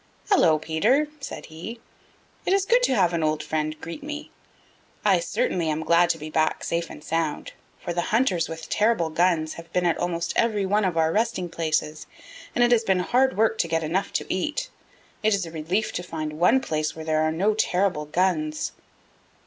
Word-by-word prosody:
"Hello, 165 Hz, -, +5 dB
Peter," 215 Hz, -, +1 dB
said 275 Hz, -, -7 dB
he. 170 Hz, +9 st, -8 dB, 0.6 s
"It 370 Hz, -, +1 dB
is 390 Hz, -1 st, +2 dB
good 485 Hz, +4 st, +4 dB
to 265 Hz, -, +2 dB
have 180 Hz, -5 st, +3 dB
an 170 Hz, -, 0 dB
old 155 Hz, -1 st, 0 dB
friend 155 Hz, 0 st, -2 dB
greet 170 Hz, -, -7 dB
me. 300 Hz, +1 st, -7 dB, 0.7 s
I -, -, +5 dB
certainly 185 Hz, -, -1 dB
am 155 Hz, +1 st, -1 dB
glad 170 Hz, +1 st, +4 dB
to -, -, +1 dB
be 155 Hz, 0 st, -8 dB
back 155 Hz, 0 st, +1 dB
safe 170 Hz, 0 st, -2 dB
and -, -, -11 dB
sound, 160 Hz, -2 st, -2 dB, 0.3 s
for 175 Hz, -, -4 dB
the 175 Hz, -, 0 dB
hunters 210 Hz, -8 st, +2 dB
with 160 Hz, 0 st, -7 dB
terrible 210 Hz, -7 st, +1 dB
guns 160 Hz, -1 st, +1 dB
have 165 Hz, 0 st, -11 dB
been 180 Hz, 0 st, +1 dB
at 170 Hz, -, +1 dB
almost 170 Hz, -1 st, -1 dB
every 215 Hz, -4 st, +2 dB
one 205 Hz, +2 st, +2 dB
of 180 Hz, -3 st, -1 dB
our 160 Hz, 0 st, +3 dB
resting 215 Hz, -3 st, 0 dB
places, 155 Hz, -2 st, -2 dB, 0.5 s
and 245 Hz, -, +4 dB
it 240 Hz, -, +3 dB
has 235 Hz, -2 st, +4 dB
been 190 Hz, -4 st, +2 dB
hard 260 Hz, +6 st, +2 dB
work 225 Hz, 0 st, +2 dB
to 170 Hz, -, +2 dB
get 165 Hz, 0 st, 0 dB
enough 175 Hz, +6 st, -1 dB
to -, -, -1 dB
eat. 300 Hz, -, -2 dB, 0.5 s
It 215 Hz, -2 st, +3 dB
is 195 Hz, -3 st, -2 dB
a 165 Hz, -, -9 dB
relief 175 Hz, +7 st, -1 dB
to -, -, -2 dB
find 155 Hz, -3 st, -5 dB
one 235 Hz, +10 st, +4 dB
place 155 Hz, -9 st, -2 dB
where 160 Hz, -1 st, -7 dB
there 155 Hz, -1 st, +1 dB
are 155 Hz, 0 st, +2 dB
no 195 Hz, +7 st, +1 dB
terrible 185 Hz, -6 st, +1 dB
guns." 155 Hz, -2 st, 0 dB
170 Hz, 200 wpm, -25 LUFS, 160-215 Hz, 0.7 s, Hello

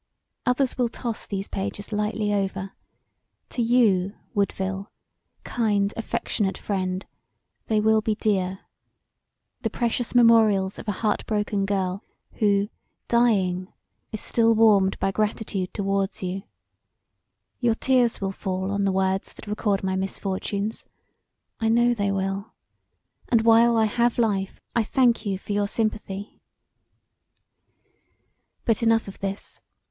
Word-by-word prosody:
Others 255 Hz, +1 st, +1 dB
will 245 Hz, -2 st, +2 dB
toss 235 Hz, -1 st, -4 dB
these 195 Hz, -1 st, -3 dB
pages 200 Hz, +2 st, -5 dB
lightly 210 Hz, 0 st, 0 dB
over: 195 Hz, -1 st, -2 dB, 0.8 s
to 245 Hz, -, -2 dB
you, 220 Hz, -5 st, +3 dB, 0.2 s
Woodville, 195 Hz, -1 st, -2 dB, 0.5 s
kind, 205 Hz, -4 st, 0 dB
affectionate 210 Hz, -3 st, -2 dB
friend, 185 Hz, -2 st, -2 dB, 0.6 s
they 215 Hz, -1 st, +2 dB
will 220 Hz, +1 st, +4 dB
be 215 Hz, -1 st, 0 dB
dear 190 Hz, -3 st, 0 dB, 1.0 s
the -, -, -1 dB
precious 240 Hz, 0 st, -1 dB
memorials 220 Hz, -5 st, +5 dB
of -, -, -9 dB
a -, -, +2 dB
heart 210 Hz, -1 st, +1 dB
broken 210 Hz, -2 st, 0 dB
girl 195 Hz, 0 st, -1 dB, 0.4 s
who, 205 Hz, -1 st, +2 dB, 0.4 s
dying, 195 Hz, -6 st, +2 dB, 0.4 s
is 215 Hz, -, -4 dB
still 230 Hz, -1 st, +3 dB
warmed 205 Hz, -4 st, +4 dB
by 195 Hz, -, 0 dB
gratitude 210 Hz, -2 st, -2 dB
towards 195 Hz, -1 st, -1 dB
you: 185 Hz, +1 st, -3 dB, 1.2 s
your 235 Hz, -3 st, +2 dB
tears 245 Hz, -2 st, +2 dB
will 195 Hz, -1 st, -2 dB
fall 190 Hz, 0 st, -3 dB
on 200 Hz, 0 st, 0 dB
the 195 Hz, -, +2 dB
words 190 Hz, 0 st, 0 dB
that -, -, -12 dB
record 205 Hz, -1 st, -1 dB
my 190 Hz, 0 st, 0 dB
misfortunes; 195 Hz, +2 st, -2 dB, 0.8 s
I 225 Hz, -, +1 dB
know 240 Hz, +1 st, +4 dB
they 200 Hz, -3 st, 0 dB
will 195 Hz, +1 st, -3 dB, 0.7 s
and 230 Hz, -2 st, +4 dB
while 230 Hz, +1 st, +5 dB
I 220 Hz, -, +4 dB
have 235 Hz, +2 st, +1 dB
life 200 Hz, -5 st, 0 dB, 0.2 s
I 235 Hz, -, +4 dB
thank 240 Hz, -1 st, +2 dB
you 195 Hz, -1 st, 0 dB
for 195 Hz, -, -8 dB
your 205 Hz, 0 st, +1 dB
sympathy. 210 Hz, -2 st, -3 dB, 2.2 s
But 230 Hz, -1 st, +2 dB
enough 225 Hz, -1 st, +3 dB
of 195 Hz, -, -9 dB
this. 195 Hz, 0 st, -5 dB
205 Hz, 130 wpm, -25 LUFS, 195-225 Hz, 2.2 s, memorials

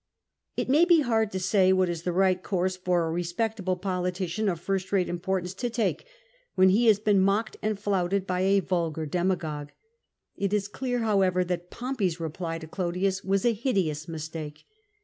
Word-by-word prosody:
It -, -, -1 dB
may 290 Hz, +6 st, +5 dB
be 345 Hz, -3 st, +5 dB
hard 225 Hz, -5 st, +1 dB
to 190 Hz, -, -2 dB
say 190 Hz, 0 st, +3 dB
what 185 Hz, -1 st, +3 dB
is 170 Hz, -2 st, -3 dB
the 180 Hz, -, -2 dB
right 185 Hz, 0 st, +2 dB
course 185 Hz, -1 st, -1 dB
for 180 Hz, -2 st, 0 dB
a 160 Hz, -, -2 dB
respectable 185 Hz, +3 st, -1 dB
politician 180 Hz, +2 st, -2 dB
of 170 Hz, -3 st, -2 dB
first 190 Hz, +1 st, -2 dB
rate 190 Hz, -3 st, +2 dB
importance 180 Hz, +1 st, -2 dB
to 240 Hz, +6 st, -3 dB
Take, 235 Hz, -, -1 dB, 0.5 s
when 185 Hz, 0 st, +6 dB
he 225 Hz, +5 st, +3 dB
has 215 Hz, -3 st, +6 dB
been 210 Hz, -1 st, +2 dB
mocked 200 Hz, +4 st, +1 dB
and 215 Hz, -1 st, -1 dB
flouted 195 Hz, -1 st, 0 dB
by 180 Hz, -1 st, -1 dB
a 195 Hz, +1 st, +3 dB
vulgar 165 Hz, -4 st, -1 dB
demagogue. 160 Hz, -3 st, -2 dB, 0.7 s
It 200 Hz, 0 st, -1 dB
is 205 Hz, -1 st, +1 dB
clear, 245 Hz, +3 st, -2 dB
however, 190 Hz, -4 st, +2 dB
that 175 Hz, 0 st, -4 dB
Pompey 245 Hz, -6 st, -1 dB
's 170 Hz, 0 st, -7 dB
reply 165 Hz, +1 st, -4 dB
to 160 Hz, -1 st, -9 dB
Olodiiis 185 Hz, +3 st, -1 dB
was 195 Hz, +2 st, 0 dB
a 240 Hz, -, +4 dB
hideous 190 Hz, -, -1 dB
mistake. 155 Hz, -2 st, -7 dB
185 Hz, 185 wpm, -27 LUFS, 175-205 Hz, 0.7 s, when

